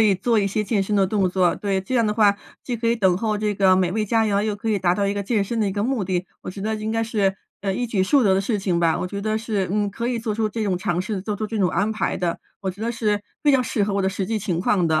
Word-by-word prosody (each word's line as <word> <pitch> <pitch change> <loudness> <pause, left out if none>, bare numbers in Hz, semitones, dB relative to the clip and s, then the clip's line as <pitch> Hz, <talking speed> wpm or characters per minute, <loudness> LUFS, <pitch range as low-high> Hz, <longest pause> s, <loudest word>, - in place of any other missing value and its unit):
可 - - +6
以 210 -2 +4
做 220 +5 +1
一 200 - +2
些 210 +2 -1
健 200 -1 +1
身 205 +1 -1
的 195 -1 +4
动 195 -1 +1
作。 180 -1 +2
对， 200 -2 -1
这 190 +7 -4
样 230 -2 +3
的 210 - 0
话， 210 -2 +4 0.3
既 245 - -2
可 230 0 -1
以 235 - +2
等 190 -4 +3
候 215 -1 0
这 210 0 -1
个 190 -1 +4
美 185 -1 +1
味 215 +2 0
佳 225 +1 +2
肴， 200 -1 +1
又 210 -1 -1
可 225 +1 -3
以 205 - +1
达 175 -1 +2
到 200 0 0
一 200 - +1
个 200 0 -2
健 205 -1 0
身 230 +2 -2
的 205 - +2
一 - - -3
个 205 0 -1
目 255 -2 0
的。 180 -1 -1 0.2
我 - - -6
觉 195 +1 -8
得 220 +1 -1
应 215 +1 -3
该 225 0 0
是， 200 -4 0 0.2
呃， 195 -1 -1
一 245 +2 -1
举 205 -4 0
数 265 +5 +3
得 195 - +4
的 190 - +2
事 210 +1 -1
情 180 -3 0
吧。 165 -1 +2
我 180 - -2
觉 200 +2 -5
得 215 +1 -1
是， 215 -5 -2
嗯， 205 0 0
可 235 +4 -3
以 240 -2 -1
做 220 -2 -2
出 220 -1 0
这 220 +1 -3
种 190 -3 0
尝 175 -1 -1
试， 205 -1 -3
做 205 +1 -3
出 215 - -3
这 220 0 -4
种 185 -2 +3
安 205 +6 0
排 215 - -1
的， 175 -2 -2 0.2
我 190 - -1
觉 190 - -13
得 230 +1 -1
是 215 -3 0 0.2
比 290 - +4
较 260 -2 +4
适 210 -3 0
合 205 - -2
我 200 - +1
的 190 - +1
实 195 0 -3
际 220 +2 -1
情 185 -5 -2
况 180 -2 +2
的。 155 -1 +2
205 Hz, 360 characters per minute, -23 LUFS, 190-220 Hz, 0.3 s, 可